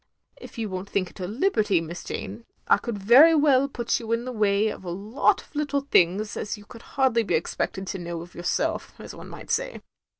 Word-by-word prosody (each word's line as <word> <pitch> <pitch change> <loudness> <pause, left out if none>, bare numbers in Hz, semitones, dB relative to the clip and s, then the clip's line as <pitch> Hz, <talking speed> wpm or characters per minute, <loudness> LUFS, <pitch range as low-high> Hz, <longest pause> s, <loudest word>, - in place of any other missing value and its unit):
If - - -12
you 225 -2 -2
won't 190 0 -6
think 185 -3 -1
it - - -17
a 180 - -3
liberty. 215 - +1
Miss 165 +2 -7
Jane, 105 +4 -6 0.2
I - - +6
could 215 +1 -5
very 255 +12 +7
well 280 -3 +4
put 240 -4 -1
you 230 -1 -6
in 230 +1 -1
the 255 - -4
way 210 -2 +2
of 210 - -7
a 180 - -6
lot 205 +9 +1
of - - -25
little 290 -1 0
things 210 -5 +2
as 210 - -4
you 205 - -14
could 230 +2 -13 0.2
hardly 260 -4 +3
be 200 -6 0
expected 190 +4 -2
to 190 0 -5
know 170 -1 -5
of 175 +1 -12
yourself, 175 +1 -2
as - - -9
one - - -11
might - - -9
say. - - -1
210 Hz, 225 wpm, -25 LUFS, 185-250 Hz, 0.2 s, very